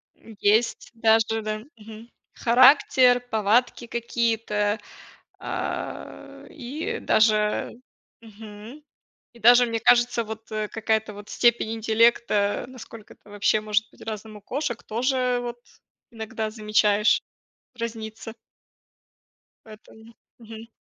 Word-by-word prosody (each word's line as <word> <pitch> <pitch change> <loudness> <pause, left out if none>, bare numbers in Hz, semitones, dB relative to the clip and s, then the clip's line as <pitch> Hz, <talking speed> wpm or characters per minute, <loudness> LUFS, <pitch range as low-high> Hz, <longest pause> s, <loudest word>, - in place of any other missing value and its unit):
М, 225 -2 -15
есть 220 +3 +1
даже, 225 0 +2
да, 215 0 -4 0.2
мгм, 220 +2 -12 0.2
характер, 250 0 +5
повадки 225 +3 +1
какие-то. 225 -3 -1 0.6
А, - - -6
и 285 +3 -5
даже 215 -1 +2 0.5
мгм, 220 +5 -12 0.5
и - - -16
даже, 245 +2 +6
мне 230 -1 -3
кажется, 240 0 +3
вот, 220 0 -9
э, 215 -1 -2
какая-то 220 -1 -2
вот 205 +1 -12
степень 235 -2 +2
интеллекта, 225 -1 +1
насколько 230 -4 -12
это 205 - -21
вообще 205 +1 +1
может 215 0 -1
быть - - -23
разным 215 -1 -7
у - - -12
кошек 260 -1 -4
тоже 250 +2 0
вот 240 0 -6 0.5
иногда 220 -1 -5
замечаешь, 210 -1 +2 0.6
разнится. 225 -1 -6 1.3
Поэтому, 220 +1 -16 0.3
мгм. 225 0 -11
225 Hz, 105 wpm, -24 LUFS, 215-235 Hz, 1.3 s, даже